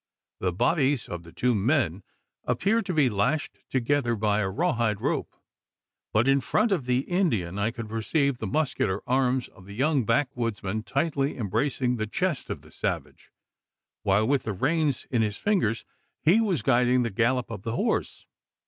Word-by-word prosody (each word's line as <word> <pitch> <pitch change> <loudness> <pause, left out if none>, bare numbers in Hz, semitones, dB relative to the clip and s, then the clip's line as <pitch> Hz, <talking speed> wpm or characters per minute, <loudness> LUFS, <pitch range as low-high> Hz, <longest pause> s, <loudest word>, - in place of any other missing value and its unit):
The 90 - 0
bodies 135 - +1
of 85 - -5
the 85 -1 -14
two 125 +7 +1
men 110 - +1 0.4
appeared 200 - +1
to 185 - -1
be 150 -4 +4
lashed 125 +8 -1
together 130 -1 +1
by 105 -1 +1
a 95 -2 0
raw 170 - 0
hide 110 -3 0
rope; - - -2 0.8
but, 110 +4 +2
in 135 0 +4
front 215 - +1
of 155 -10 0
the 125 +1 +2
Indian, 115 - 0
I 100 +2 +1
could 115 -1 -6
perceive 125 +5 0
the 110 - -3
muscular 105 -6 0
arms 130 0 +1
of 95 - -17
the 100 - -9
young 140 +2 +2
backwoodsman 115 -4 -1
tightly 140 -1 0
embracing 125 +3 0
the 110 -1 -2
chest 150 - -2
of - - -5
the - - -17
savage, - - -4 0.7
while 100 - +2
with 140 0 +2
the 110 - -3
reins 145 - 0
in 120 -3 +2
his 105 -2 -1
fingers 180 - 0 0.4
he 185 +9 +5
was 185 - 0
guiding 125 0 +3
the 115 - -2
gallop 120 +4 +1
of 105 -4 -6
the 115 +3 -3
horse! - - -1
125 Hz, 175 wpm, -26 LUFS, 110-145 Hz, 0.8 s, he